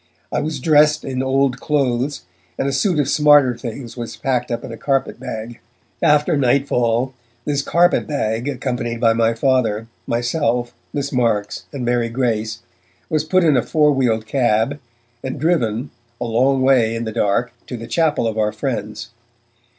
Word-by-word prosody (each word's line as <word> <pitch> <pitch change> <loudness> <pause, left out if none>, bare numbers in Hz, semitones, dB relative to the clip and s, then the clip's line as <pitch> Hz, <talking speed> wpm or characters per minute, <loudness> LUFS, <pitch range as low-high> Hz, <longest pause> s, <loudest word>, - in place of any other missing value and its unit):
I - - 0
was 155 -2 -3
dressed 150 +1 +4
in 130 -1 -2
old 135 -1 +1
clothes, 140 -2 -1 0.3
and 135 - -1
a 140 - -1
suit 165 +5 +1
of 145 -3 +1
smarter 145 -4 +5
things 120 0 -7
was 120 -2 -6
packed 125 -2 -1
up 120 0 -3
in - - -7
a - - -6
carpet 135 +4 -1
bag. 110 +2 -6 0.4
After 150 +3 +3
nightfall, 125 -2 +1 0.3
this 145 -1 0
carpet 175 +5 +2
bag, 115 -4 -2
accompanied 125 -3 -3
by 115 -1 +4
my 115 0 +1
Father, 115 -4 +1 0.2
myself, 120 0 0 0.2
Miss 140 -1 -3
Marks 115 -5 0
and 135 -4 -4
Mary 120 -1 +1
Grace, 115 -2 -2 0.5
was 155 -1 +1
put 185 +3 +2
in 155 -4 +4
a 125 - +3
four 150 +4 +2
wheeled 120 -5 +1
cab, 120 +2 +1 0.4
and 130 - -4
driven, 130 -7 0 0.3
a 120 - -2
long 130 +3 +2
way 120 -4 +3
in 115 - -3
the 110 - -4
dark, 110 +4 0
to 125 - -5
the 115 - -7
chapel 155 -4 +1
of 110 0 -2
our 105 0 +1
friends. 110 -4 -4
125 Hz, 165 wpm, -20 LUFS, 115-140 Hz, 0.5 s, smarter